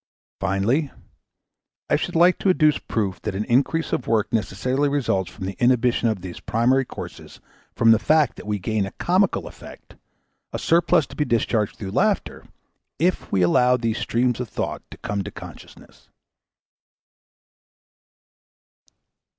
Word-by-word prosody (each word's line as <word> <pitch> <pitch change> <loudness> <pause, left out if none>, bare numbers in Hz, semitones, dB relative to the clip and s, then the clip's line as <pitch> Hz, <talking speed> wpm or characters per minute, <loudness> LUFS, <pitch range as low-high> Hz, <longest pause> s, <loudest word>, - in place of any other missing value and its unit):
Finally, 120 +11 0 1.0
I - - +2
should - - -3
like 175 +2 +5
to 195 - +1
adduce 155 -5 +3
proof 100 -4 -3
that 95 - -4
an 105 +2 -2
increase 140 +7 +1
of 125 - -2
work 110 -1 0
necessarily 125 +6 0
results 120 -10 0
from 95 - -8
the 95 0 -4
inhibition 120 -1 +2
of 105 -4 -3
these 90 -1 -8
primary 130 +4 +1
courses - - -10 0.4
from 115 0 +5
the 110 - +5
fact 155 +1 +2
that - - -10
we 105 -1 -1
gain 100 +1 -1
a - - -8
comical 185 +2 +1
effect, - - -13 0.6
a - - -3
surplus 170 -1 +3
to - - -13
be 150 - +1
discharged 115 -4 0
through 95 -3 -6
laughter, 200 - 0 0.5
if 175 +5 0
we 95 -2 +2
allow 125 +8 +4
these 115 -2 -2
streams 120 0 0
of 125 -3 -4
thought - - -4
to - - -11
come 100 -1 -3
to - - -6
consciousness. - - -13
120 Hz, 150 wpm, -23 LUFS, 105-145 Hz, 1.0 s, like